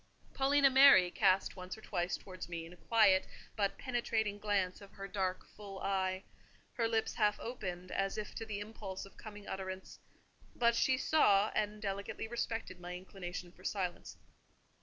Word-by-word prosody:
Paulina 275 Hz, 0 st, +4 dB
Mary 265 Hz, -10 st, +8 dB
cast 185 Hz, +2 st, +3 dB
once 185 Hz, +1 st, -7 dB
or -, -, -13 dB
twice 175 Hz, -3 st, -1 dB
towards 185 Hz, -4 st, -9 dB
me 165 Hz, -1 st, -4 dB
a 170 Hz, +2 st, -11 dB
quiet 200 Hz, -1 st, +4 dB, 0.3 s
but 200 Hz, -2 st, 0 dB
penetrating 225 Hz, -4 st, -1 dB
glance 200 Hz, -3 st, 0 dB
of 200 Hz, -, -13 dB
her 195 Hz, 0 st, -7 dB
dark, 190 Hz, -2 st, -2 dB
full 200 Hz, -2 st, -8 dB
eye; 190 Hz, -1 st, -1 dB, 0.5 s
her 230 Hz, -2 st, +1 dB
lips 225 Hz, -1 st, 0 dB
half 210 Hz, -2 st, +2 dB
opened, 185 Hz, -7 st, -5 dB
as 195 Hz, +1 st, -1 dB
if 215 Hz, -, -4 dB
to 225 Hz, -, -5 dB
the 205 Hz, -2 st, -3 dB
impulse 205 Hz, -3 st, -6 dB
of 195 Hz, -, -16 dB
coming 205 Hz, -2 st, -10 dB
utterance: 190 Hz, 0 st, -6 dB, 0.6 s
but 235 Hz, -1 st, +3 dB
she 260 Hz, +2 st, +3 dB
saw 215 Hz, -8 st, +4 dB
and 210 Hz, 0 st, -1 dB
delicately 200 Hz, +2 st, -3 dB
respected 225 Hz, -4 st, -3 dB
my 175 Hz, 0 st, -6 dB
inclination 180 Hz, -1 st, -7 dB
for 185 Hz, -, -19 dB
silence. 185 Hz, -3 st, -3 dB
200 Hz, 160 wpm, -34 LUFS, 185-220 Hz, 0.6 s, Mary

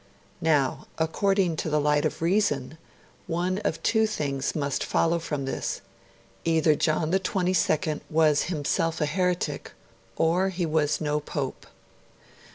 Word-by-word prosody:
Now, 150 Hz, -5 st, +1 dB
according 180 Hz, +1 st, +1 dB
to 160 Hz, -, -2 dB
the 150 Hz, 0 st, +2 dB
light 150 Hz, 0 st, +2 dB
of -, -, -2 dB
reason, 160 Hz, -6 st, +1 dB, 0.5 s
one 180 Hz, +3 st, -1 dB
of -, -, -2 dB
two 220 Hz, -1 st, +3 dB
things 140 Hz, -9 st, -2 dB
must 140 Hz, -3 st, -1 dB
follow 170 Hz, +1 st, +1 dB
from 150 Hz, -4 st, -3 dB
this 135 Hz, -, -3 dB, 0.6 s
either 160 Hz, -1 st, +3 dB
John 155 Hz, +1 st, 0 dB
XXII 180 Hz, -5 st, +1 dB
was 155 Hz, -2 st, +3 dB
himself 165 Hz, 0 st, -1 dB
a 150 Hz, -, +2 dB
heretic, 180 Hz, +3 st, -1 dB, 0.4 s
or 175 Hz, +4 st, +2 dB
he 180 Hz, -2 st, -2 dB
was 155 Hz, -2 st, +1 dB
no 150 Hz, -1 st, 0 dB
Pope. 145 Hz, -2 st, -5 dB
160 Hz, 130 wpm, -26 LUFS, 150-180 Hz, 0.6 s, two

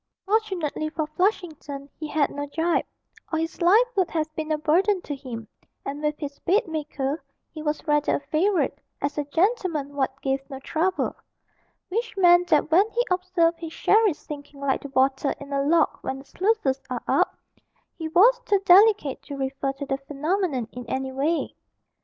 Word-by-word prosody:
Fortunately 380 Hz, -8 st, 0 dB
for 310 Hz, 0 st, -2 dB
Flushington, 310 Hz, -5 st, -2 dB
he 310 Hz, -, -4 dB
had 295 Hz, -1 st, +1 dB
no 285 Hz, 0 st, -4 dB
gyp, 325 Hz, +4 st, 0 dB, 0.5 s
or 320 Hz, -, +1 dB
his 325 Hz, +2 st, -3 dB
life 405 Hz, +8 st, +6 dB
would 375 Hz, -3 st, +2 dB
have 310 Hz, -1 st, -2 dB
been 315 Hz, 0 st, -3 dB
a 310 Hz, -, +2 dB
burden 365 Hz, +7 st, +2 dB
to 290 Hz, -, -4 dB
him, 235 Hz, -5 st, -8 dB, 0.4 s
and 285 Hz, +2 st, -4 dB
with 300 Hz, 0 st, -1 dB
his 285 Hz, -2 st, -6 dB
bedmaker 315 Hz, -, -1 dB, 0.3 s
he 310 Hz, -, -8 dB
was 305 Hz, 0 st, -2 dB
rather 295 Hz, -1 st, +2 dB
a -, -, -1 dB
favourite, 315 Hz, +7 st, +1 dB, 0.3 s
as 285 Hz, +1 st, -2 dB
a 295 Hz, -, -1 dB
'gentleman 330 Hz, -, 0 dB
what 270 Hz, -1 st, -1 dB
gave 270 Hz, 0 st, 0 dB
no 270 Hz, -, -6 dB
trouble' 340 Hz, +6 st, -1 dB, 0.7 s
which 450 Hz, +2 st, -3 dB
meant 355 Hz, -1 st, +6 dB
that 310 Hz, -1 st, +2 dB
when 385 Hz, +7 st, +5 dB
he 480 Hz, +2 st, 0 dB
observed 360 Hz, -2 st, +1 dB
his 325 Hz, -1 st, -7 dB
sherry 430 Hz, -4 st, +4 dB
sinking 290 Hz, -1 st, -10 dB
like 280 Hz, -1 st, 0 dB
the 285 Hz, -, -8 dB
water 265 Hz, +1 st, +1 dB
in 285 Hz, 0 st, -8 dB
a 275 Hz, -, +1 dB
lock 315 Hz, +3 st, +2 dB
when 265 Hz, -, -3 dB
the 270 Hz, -, -12 dB
sluices 360 Hz, -11 st, 0 dB
are 250 Hz, -1 st, -4 dB
up, -, -, +2 dB, 0.6 s
he 320 Hz, -, -4 dB
was 440 Hz, +10 st, +5 dB
too 410 Hz, -, +3 dB
delicate 390 Hz, -6 st, +5 dB
to 285 Hz, -1 st, -8 dB
refer 270 Hz, 0 st, -2 dB
to 275 Hz, +1 st, -6 dB
the 270 Hz, -1 st, -1 dB
phenomenon 295 Hz, -, -2 dB
in 250 Hz, -, -7 dB
any 265 Hz, 0 st, -2 dB
way. 295 Hz, +5 st, -1 dB
310 Hz, 175 wpm, -25 LUFS, 280-365 Hz, 0.7 s, life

